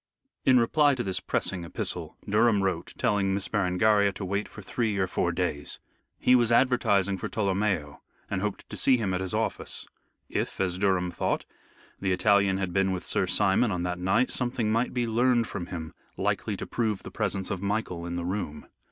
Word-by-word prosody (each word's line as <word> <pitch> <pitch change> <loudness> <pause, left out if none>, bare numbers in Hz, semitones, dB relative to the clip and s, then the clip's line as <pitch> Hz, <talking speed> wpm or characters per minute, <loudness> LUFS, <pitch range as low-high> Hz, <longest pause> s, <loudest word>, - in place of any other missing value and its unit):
In 130 -2 +6
reply 145 +4 +3
to 120 - -2
this 95 -3 -1
pressing 90 -2 -2
epistle, 85 - -3
Durham 105 -1 +3
wrote, 95 - -2
telling 95 -2 +1
Miss 100 -1 -1
Berengaria 100 +1 +3
to 95 - -5
wait 100 +3 -1
for 100 - -11
three 110 0 -1
or 95 - +2
four 90 -1 0
days. 85 -4 -2 0.4
He 125 - +3
was 120 -2 +3
advertising 100 -6 +3
for - - -3
Tolomeo, 95 -7 -1 0.3
and 95 -2 -2
hoped 105 -1 -3
to - - -5
see 130 -2 +4
him 100 -5 -1
at 90 - -1
his 95 -1 -3
office. - - -2 0.4
If, - - -3
as 90 -1 0
Durham 95 -3 +1
thought, - - -1 0.5
the 95 -1 0
Italian 100 0 +3
had 95 -2 -2
been 95 0 +2
with 90 -1 -3
Sir - - +1
Simon 95 +5 +3
on 90 -2 -2
that 90 0 -2
night, 95 +8 +2
something 120 -3 -1
might 115 +3 +1
be 125 -1 0
learned 120 +1 +2
from 90 -5 -5
him 80 -3 -6 0.2
likely - - -1
to - - -5
prove 110 -4 -1
the - - -8
presence 100 -3 -2
of 95 -2 -3
Michael 100 -4 -2
in 85 - -4
the 85 -1 -3
room. 90 -5 -4
100 Hz, 195 wpm, -27 LUFS, 90-110 Hz, 0.5 s, In